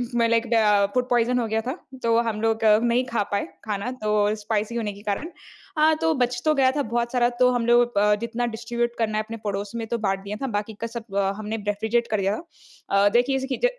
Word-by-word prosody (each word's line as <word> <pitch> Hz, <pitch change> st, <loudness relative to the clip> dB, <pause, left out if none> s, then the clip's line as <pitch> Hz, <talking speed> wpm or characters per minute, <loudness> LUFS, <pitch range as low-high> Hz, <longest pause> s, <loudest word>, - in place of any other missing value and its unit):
म 235 Hz, -1 st, +3 dB
like 230 Hz, +1 st, +2 dB
the 210 Hz, -3 st, +4 dB
food 250 Hz, 0 st, 0 dB
poison 245 Hz, 0 st, +2 dB
हो 230 Hz, -, -1 dB
गया 220 Hz, +1 st, 0 dB
था। 260 Hz, +8 st, -4 dB, 0.3 s
तो 230 Hz, 0 st, +3 dB
हम 215 Hz, 0 st, -4 dB
लोग 225 Hz, 0 st, +1 dB, 0.2 s
नहीं 240 Hz, +1 st, +2 dB
खा 220 Hz, -3 st, +1 dB
पाए 200 Hz, -, 0 dB, 0.2 s
खाना 210 Hz, +3 st, -3 dB
तो 210 Hz, -, 0 dB, 0.2 s
स्पाइसी 215 Hz, +1 st, -2 dB
होने 215 Hz, -3 st, -2 dB
के 200 Hz, -, -13 dB
कारण। 210 Hz, -, -3 dB, 0.5 s
हाँ, 310 Hz, +1 st, +5 dB
तो 325 Hz, 0 st, +1 dB
बच 245 Hz, -3 st, 0 dB
तो 310 Hz, -, +4 dB
गया 265 Hz, -1 st, +4 dB
था 290 Hz, -, +1 dB
बहुत 235 Hz, 0 st, -1 dB
सारा 245 Hz, -2 st, +3 dB
तो 250 Hz, 0 st, +6 dB
हम 245 Hz, -2 st, 0 dB
लोग 240 Hz, -2 st, +3 dB
अ, 210 Hz, +1 st, +4 dB
जितना 235 Hz, +1 st, -2 dB
डिस्ट्रीब्यूट 235 Hz, +1 st, -2 dB
करना 215 Hz, -1 st, 0 dB
है 215 Hz, -, 0 dB
अपने 230 Hz, +1 st, -7 dB
पड़ोस 200 Hz, 0 st, -3 dB
में 230 Hz, -1 st, -3 dB
तो 235 Hz, -, -1 dB
बाँट 195 Hz, -3 st, -1 dB
दिया 205 Hz, +1 st, -5 dB
था 270 Hz, -, -1 dB
बाकी 210 Hz, +1 st, -4 dB
का 230 Hz, -, -1 dB
सब 225 Hz, -3 st, -8 dB
अ, 195 Hz, -1 st, +2 dB
हमने 215 Hz, +1 st, -4 dB
रेफ़्रिजरेट 220 Hz, +3 st, 0 dB
कर 215 Hz, -, +1 dB
दिया 195 Hz, +2 st, +1 dB
था। 200 Hz, -, -3 dB
अ, -, -, +6 dB
देखिए 245 Hz, +5 st, +2 dB
जैसे 265 Hz, 0 st, -2 dB
कि -, -, +3 dB
230 Hz, 245 wpm, -24 LUFS, 210-245 Hz, 0.5 s, तो